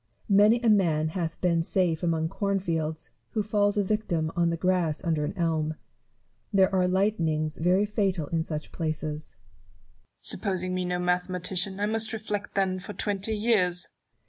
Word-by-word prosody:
Many 210 +4 +6
a 240 - +1
man 165 -7 +3
hath 165 -1 -3
been 170 -2 +2
safe 170 -1 0
among 165 -2 +1
corn 200 +4 -1
fields, 160 -4 -3 0.2
who 215 - +1
falls 205 0 +1
a 205 - +3
victim 180 -6 -1
on 170 -1 +2
the 170 - -1
grass 175 -2 0
under 160 -4 0
an - - -5
elm. 160 -2 0 0.8
There 195 -2 +4
are 185 -1 +3
lightnings 165 -6 0
very 180 +5 +3
fatal 195 -6 0
in 165 -1 0
such 155 -2 -5
places. 155 -2 -4
Newton. - - -33
Supposing 185 -3 -2
me 185 0 -1
no 180 0 -1
mathematician, 180 +1 -1
I 205 - +1
must 225 +2 -1
reflect 210 -2 -4
then 190 -1 +1
for 190 +3 -7
twenty 205 +1 -1
years 185 -6 +1
180 Hz, 165 wpm, -27 LUFS, 165-200 Hz, 0.8 s, Many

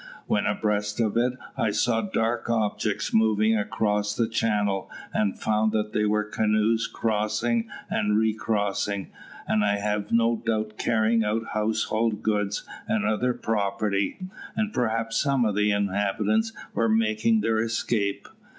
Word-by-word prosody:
When 105 - +1
abreast 105 0 -1
of 110 -2 +1
it 120 +2 +2 0.2
I 110 - +1
saw 110 +2 +1
dark 115 +2 -1
objects 110 -3 -1
moving 110 0 +3
across 105 0 0
the 115 - +1
channel, 105 -3 0 0.2
and 105 -2 0
found 110 0 +1
that 105 -1 -1
they 105 - +2
were 105 0 +2
canoes 110 +2 +1
crossing 110 +1 0 0.2
and 105 0 +1
recrossing, 105 -3 -1 0.4
and 105 - +2
I 100 0 +2
have 105 0 -2
no 115 0 +3
doubt 110 -1 -2
carrying 115 0 +2
off 110 +2 0
household 110 0 0
goods 105 -2 0 0.2
and 220 -1 0
other 125 +3 +1
property, 100 -2 -1 0.4
and 215 -1 -1
perhaps 115 -1 0
some 135 -4 +2
of 105 - +1
the 105 +1 +2
inhabitants 100 - +1 0.2
were 115 -1 +1
making 110 0 +2
their 110 +1 +1
escape. 110 -2 -1
110 Hz, 140 wpm, -26 LUFS, 105-115 Hz, 0.4 s, moving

